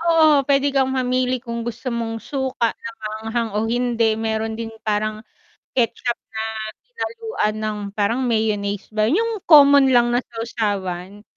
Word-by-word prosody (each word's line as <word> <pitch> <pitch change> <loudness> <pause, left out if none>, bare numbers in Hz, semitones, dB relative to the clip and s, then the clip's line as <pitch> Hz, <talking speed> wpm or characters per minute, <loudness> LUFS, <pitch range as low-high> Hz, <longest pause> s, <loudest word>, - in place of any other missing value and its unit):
Oo, 320 -3 +5
puwede 280 0 +3
kang 265 -1 +2
mamili 255 0 +1
kung 235 -2 -4
gusto 240 +2 -4
mong 230 -1 -2
suka 260 -4 -1
na 230 - -8
maanghang 220 +2 -3
o 210 - -1
hindi, 235 -2 +1
meron 220 0 -2
din 225 -1 -5
parang 215 0 -1 0.5
ketchup 240 0 0
na - - -27 0.5
hinaluan 455 - -3
ng 215 -1 -2 0.2
parang 215 +4 +1
mayonnaise 210 -3 -1
ba, 215 +2 +2
'yung 440 +3 0
common 280 -3 +7
lang 240 -1 +4
na 245 - +3
sawsawan. 205 -4 -4
235 Hz, 145 wpm, -21 LUFS, 215-265 Hz, 0.5 s, common